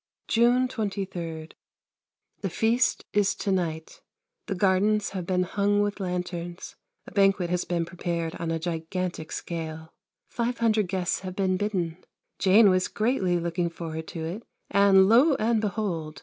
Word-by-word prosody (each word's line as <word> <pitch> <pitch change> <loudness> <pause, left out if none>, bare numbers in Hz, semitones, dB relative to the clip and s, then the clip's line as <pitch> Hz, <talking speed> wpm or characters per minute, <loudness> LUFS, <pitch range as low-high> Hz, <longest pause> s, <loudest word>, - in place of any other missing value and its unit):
June 245 +2 +3
23. 190 -8 -4 0.9
The 195 - -2
feast 230 +7 +1
is 205 -1 +2
to 200 - -2
night. 160 -4 -2 0.5
The 195 - -2
gardens 200 +2 +2
have 185 -3 -5
been 185 -1 +2
hung 200 +2 +1
with 205 0 -2
lanterns: 180 -1 -4 0.3
a - - -11
banquet 195 -3 +2
has 180 0 0
been 170 -1 -1
prepared 170 -2 -3
on 165 -1 -3
a 165 - 0
gigantic 165 0 -4
scale. 160 -1 -6 0.3
Five 240 0 -2
hundred 220 -3 +2
guests 180 -1 -1
have 185 -1 -7
been 190 -1 +1
bidden. 185 -4 -2 0.4
Jane 200 +2 +6
was 185 0 +2
greatly 200 -6 0
looking 170 0 -1
forward 160 -1 -6
to 160 -2 -5
it 180 +7 -5 0.3
and 195 -1 +6
lo 260 +8 +5
and 225 -1 +1
behold! 180 -7 -3
185 Hz, 150 wpm, -26 LUFS, 170-205 Hz, 0.9 s, Jane